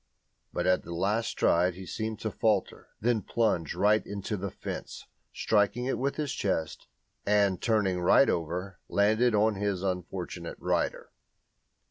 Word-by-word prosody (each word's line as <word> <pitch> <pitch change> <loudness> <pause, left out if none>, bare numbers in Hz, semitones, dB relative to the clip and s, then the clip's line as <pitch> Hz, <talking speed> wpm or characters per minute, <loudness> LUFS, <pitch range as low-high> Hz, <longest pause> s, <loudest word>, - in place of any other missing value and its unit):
But - - -2
at 90 0 +3
the 85 - -7
last 105 +6 0
stride 90 +1 +2
he 95 +1 -9
seemed 110 +3 -4
to 110 - -2
falter, 105 -3 0
then 115 0 +1
plunged 95 -6 0
right 105 +1 +3
into 100 +1 -4
the 100 0 -4
fence, - - -7 0.3
striking 110 +3 +1
it 135 - -1
with 140 +2 -1
his 150 -3 -2
chest, 80 -6 -2 0.4
and, 100 -3 +2
turning 105 -6 +1
right 90 +9 +5
over, 90 +3 -2
landed 110 +3 +3
on 110 +1 +3
his 100 -2 -2
unfortunate 90 -2 -4
rider. - - -1
100 Hz, 145 wpm, -29 LUFS, 90-110 Hz, 0.4 s, right